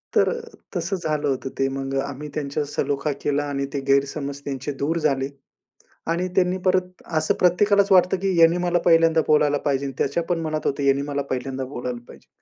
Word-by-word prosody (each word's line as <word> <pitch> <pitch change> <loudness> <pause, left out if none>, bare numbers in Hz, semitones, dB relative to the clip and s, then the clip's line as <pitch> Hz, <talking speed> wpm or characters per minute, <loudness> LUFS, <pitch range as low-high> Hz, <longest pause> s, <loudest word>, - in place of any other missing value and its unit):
तर - - +4
अ, 475 - -3 0.4
तसं 175 +3 -1
झालं 150 -1 0
होतं 135 0 -2
ते. 135 - +3
मग 135 0 -4
आम्ही 140 +2 -7
त्यांच्या 145 0 -2
सलोखा 145 0 -1
केला 145 0 +1
आणि 140 -1 -2
ते 140 - -1
गैरसमज 140 0 0
त्यांचे 135 +1 -4
दूर 165 +3 0
झाले 135 -3 0 0.8
आणि 175 +2 0
त्यांनी 180 0 +3
परत 185 0 0 0.2
असं - - +1
प्रत्येकालाच 200 +3 +4
वाटतं 185 0 +5
की 190 -2 +1
यांनी 165 +1 +6
मला 175 0 +1
पहिल्यांदा 165 -1 +5
बोलायला 150 -1 +4
पाहिजेन 140 -1 0
आणि 135 - -7
त्याच्या 140 +5 0
पण 170 -2 +1
मनात 155 -1 -3
होतं 140 0 -1
यांनी 140 0 +3
मला 140 0 -2
पहिल्यांदा 130 +1 -3
बोलायला 125 -2 -5
पाहिजे. - - -15
145 Hz, 190 wpm, -23 LUFS, 140-170 Hz, 0.8 s, यांनी